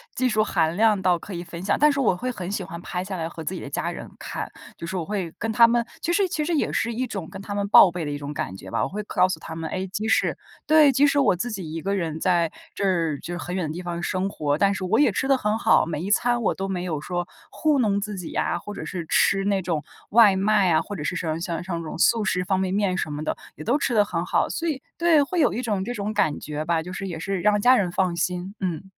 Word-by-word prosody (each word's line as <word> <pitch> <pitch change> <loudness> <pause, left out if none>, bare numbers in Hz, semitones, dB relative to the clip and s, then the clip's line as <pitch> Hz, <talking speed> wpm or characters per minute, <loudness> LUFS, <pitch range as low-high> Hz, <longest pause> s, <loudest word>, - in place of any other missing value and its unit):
技 255 0 +1
术 215 -1 +2
含 165 -5 0
量 215 -2 +4
到 180 -1 +3
可 195 - -9
以 175 0 -4
分 170 -1 -9
享。 200 +1 +2
但 300 +1 +6
是 280 - -2
我 215 -9 +3
会 250 +7 -3
很 190 -6 -5
喜 205 - -2
欢 170 -2 -8
拍 180 0 -4
下 190 -1 -5
来 160 - -2
和 165 -1 -8
自 180 +4 -3
己 - - -5
的 - - -7
家 - - -2
人 - - -7
看， - - -5 0.3
就 - - -7
是 180 +3 -5
我 175 - -1
会 190 -3 -3
跟 225 0 -1
他 230 +1 +7
们 235 0 +2 0.2
其 340 - -1
实 395 +1 +3
其 305 -2 -1
实 345 - -1
也 300 - +1
是 235 +1 -1
一 255 +3 -2
种 195 -8 -5
跟 190 - -8
他 200 +1 -5
们 200 0 -1
报 200 - +9
备 175 -2 -4
的 145 - -3
一 145 - -4
种 145 0 -6
感 95 -9 -4
觉 95 0 -10
吧。 - - 0
我 - - -1
会 210 +4 -4
告 185 - +2
诉 185 - -3
他 160 - -8
们， 160 0 -4
诶， 190 +1 -3
即 210 +4 -3
使 220 - +2 0.3
对， 305 -2 +6
即 275 +3 +4
使 285 - +1
我 245 -9 +4
自 210 +8 -3
己 185 -7 -5
一 165 - -4
个 200 +1 -1
人 160 -4 -2
在 170 -2 +2 0.2
这 170 -6 0
就 175 - -7
是 175 - -4
很 180 - -4
远 180 -4 -1
的 155 - -4
地 180 - -5
方 175 -1 -4
生 185 +2 -1
活， 145 -4 -1
但 200 0 +3
是 190 - -4
我 190 +5 +2
也 285 -6 +5
吃 265 +7 -1
得 270 - +5
很 210 -2 0
好， 225 - +4
每 160 -1 -3
一 200 - -2
餐 240 +3 +2
我 - - +2
都 195 - -4
没 185 -2 -3
有 155 -5 -3
说 175 +1 -3 0.2
糊 300 -3 +1
弄 205 -4 +2
自 210 0 -4
己 180 -3 -7
啊， - - 0
或 210 - -8
者 - - -6
是 170 -4 -5
吃 195 +2 +3
那 200 -1 +2
种 165 -3 -1 0.3
外 215 -3 +7
卖 195 -1 +3
啊， 160 - +4
或 205 - -6
者 150 - -5
是 170 +5 -2
说 160 -2 -2
像 170 -1 -3
像 175 -2 -3
那 - - -6
种 155 - -6
素 220 +5 +3
食 180 -1 +1
方 190 0 0
便 190 0 -1
面 195 -2 +1
什 155 - -2
么 150 +1 -4
的 - - -2 0.2
也 - - -9
都 245 - +2
吃 270 - -1
得 210 -2 +5
很 205 - -3
好， - - +1
所 335 - -3
以 290 -5 -2 0.2
对， 335 -3 +4
会 350 +5 -2
有 280 -7 +3
一 240 - -2
种 210 -6 -1
这 240 +5 -4
种 210 -1 -3
感 155 -8 +1
觉 150 0 -5
吧， 165 -1 +1
就 180 - -8
是 195 +1 -4
也 165 -3 -5
是 195 +2 -2
让 210 +3 +3
家 250 +4 +6
人 185 -7 +1
放 180 -2 0
心。 180 +2 -2
嗯。 185 0 -3
190 Hz, 320 characters per minute, -24 LUFS, 170-215 Hz, 0.3 s, 报